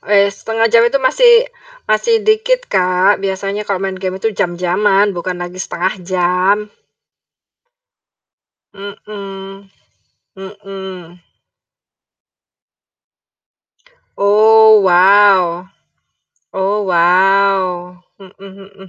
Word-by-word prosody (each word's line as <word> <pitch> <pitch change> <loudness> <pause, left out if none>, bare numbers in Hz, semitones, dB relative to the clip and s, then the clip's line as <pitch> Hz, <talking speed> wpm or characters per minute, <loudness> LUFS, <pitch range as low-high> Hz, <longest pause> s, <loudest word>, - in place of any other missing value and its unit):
Wes, 200 -1 0
1/2 225 0 -2
jam 230 - +5
itu 275 - -1
masih 475 - +3 0.5
masih 450 - 0
dikit, 470 +4 0
Kak, 185 +2 +1
biasanya 195 +2 -5
kalau 195 -1 -3
main 190 -1 -5
game 185 -1 -4
itu 220 +3 -3
jam-jaman 195 +3 0
bukan 180 0 -5
lagi 175 +1 -8
1/2 185 0 -3
jam. 180 +2 0 2.2
Mhm, 195 -1 -11 0.7
mhm. 190 -3 -11 3.0
Oh, 220 +2 +4
wow 185 -1 +3 0.9
oh, 195 +2 -1
wow, 180 0 +1 0.2
mhm 195 0 -15
mhm 195 0 -14
195 Hz, 85 wpm, -14 LUFS, 185-205 Hz, 3.0 s, jam